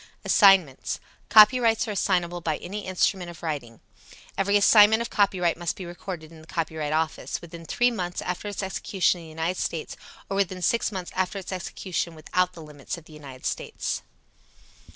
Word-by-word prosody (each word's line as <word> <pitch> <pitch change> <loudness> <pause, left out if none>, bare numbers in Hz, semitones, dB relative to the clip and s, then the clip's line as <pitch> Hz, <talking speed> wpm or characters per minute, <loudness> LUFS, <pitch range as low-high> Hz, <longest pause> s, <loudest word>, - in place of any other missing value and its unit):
Assignments. 190 - +4 0.3
Copyrights 225 +1 +6
are - - -2
assignable 175 -3 0
by 160 -2 -1
any 200 +3 -6
instrument 185 -1 0
of 170 -1 -12
writing. 140 -8 -5 0.5
Every 200 +1 +3
assignment 215 +2 +6
of 235 - -7
copyright 185 -4 +2
must 175 -1 -2
be 185 - -7
recorded 175 -2 -7
in 160 -1 -13
the 160 - -17
Copyright 160 -3 -3
Office 160 0 -1
within 170 0 -11
three 245 +8 +2
months 180 -6 -3
after 180 +3 -4
its 205 -1 -4
execution 190 -1 0
in 165 - -11
the - - -11
United 165 +3 -2
States 160 -2 -3 0.3
or 195 - -3
within 185 -2 -1
six 230 +4 +1
months 185 -3 -5
after 190 +2 -1
its 190 -1 -6
execution 180 -2 -4
without 180 +3 0
the 165 -3 -10
limits 150 +1 -7
of 165 - -13
the 160 - -15
United 135 -4 -11
States. - - -3
180 Hz, 175 wpm, -26 LUFS, 160-195 Hz, 0.5 s, Copyrights